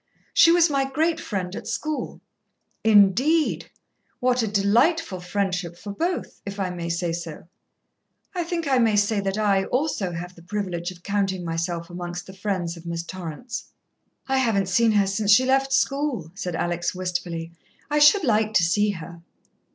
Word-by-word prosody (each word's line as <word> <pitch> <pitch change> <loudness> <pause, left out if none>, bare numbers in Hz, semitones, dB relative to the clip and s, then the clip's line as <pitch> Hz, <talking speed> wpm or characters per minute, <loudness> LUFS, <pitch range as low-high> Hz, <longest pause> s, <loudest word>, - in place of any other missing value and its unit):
"She 335 - +7
was 345 -1 +5
my 275 -3 +1
great 320 +4 +1
friend 190 - -4
at - - -7
school." 300 +6 -3 0.6
"Indeed! 220 - +4 0.5
What 250 0 +2
a 225 - 0
delightful 210 - +2
friendship 180 -1 -2
for 205 - -7
both, 350 - -3
if 200 0 -7
I 185 -2 -1
may 170 -1 -5
say 170 0 -1
so. 165 -2 -7 0.9
I 355 -2 -1
think 335 -2 -3
I 265 -2 +3
may 225 -3 +3
say 205 +1 +2
that 195 0 -2
I, 200 -3 +2
also, 250 - -1
have 175 +2 -6
the 170 - -16
privilege 175 -1 -3
of 180 -1 -12
counting 195 -3 -1
myself 170 +1 -2
amongst 175 0 -6
the 190 - -11
friends 190 -4 -2
of 170 0 -11
Miss 170 0 -3
Torrance." 185 - -6 0.6
"I 265 0 +2
haven't 205 -7 +1
seen 225 +4 +3
her 205 -1 +4
since 200 +2 -1
she 250 +5 +6
left 270 +1 +2
school," 275 - 0
said 185 -3 -4
Alex 175 +1 -1
wistfully. 175 -2 -3 0.4
"I 300 - +3
should 300 +6 +6
like 215 -4 +1
to 175 - +5
see 205 +5 +2
her." 170 -3 -7
200 Hz, 170 wpm, -24 LUFS, 175-250 Hz, 0.9 s, She